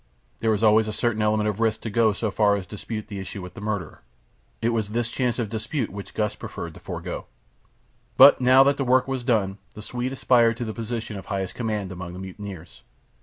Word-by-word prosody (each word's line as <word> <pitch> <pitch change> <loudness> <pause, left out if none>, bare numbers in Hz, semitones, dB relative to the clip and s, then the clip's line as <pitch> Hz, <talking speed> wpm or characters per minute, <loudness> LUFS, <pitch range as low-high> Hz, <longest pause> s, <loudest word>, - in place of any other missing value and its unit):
There 110 -1 +2
is 105 - -3
always 110 0 +5
a 110 - -3
certain 110 -1 0
element 105 0 +2
of 105 0 -2
risk 110 -1 +1
to 115 - -5
go 110 0 +4
so 105 +1 -2
far 100 0 +3
as 100 -2 -4
to - - -24
dispute 110 +1 -5
the 100 -2 -6
issue 95 +1 -6
with 90 -1 -8
the - - -10
murderer. 105 -6 -4 0.6
It 115 - +1
was 110 -3 -1
this 120 +2 -1
chance 125 -1 -1
of 120 -3 -1
dispute 115 +3 -3
which 100 0 -9
Gust 105 -1 -1
preferred 85 -1 -6
to - - -13
forgo. - - -6 0.9
But - - +9
now 130 +2 +7
that 140 0 +2
the 140 - 0
work 130 +1 +3
was 135 -2 -2
done 105 -5 +1 0.2
the 105 - -8
Swede 125 +3 -3
aspired 120 -3 +3
to 120 - -3
the 110 - -4
position 115 -2 -4
of 95 - -9
highest 95 -2 -3
command 105 -5 -3
among 90 -1 -7
the 90 - -8
mutineers. 95 -2 -9
110 Hz, 225 wpm, -25 LUFS, 100-120 Hz, 0.9 s, But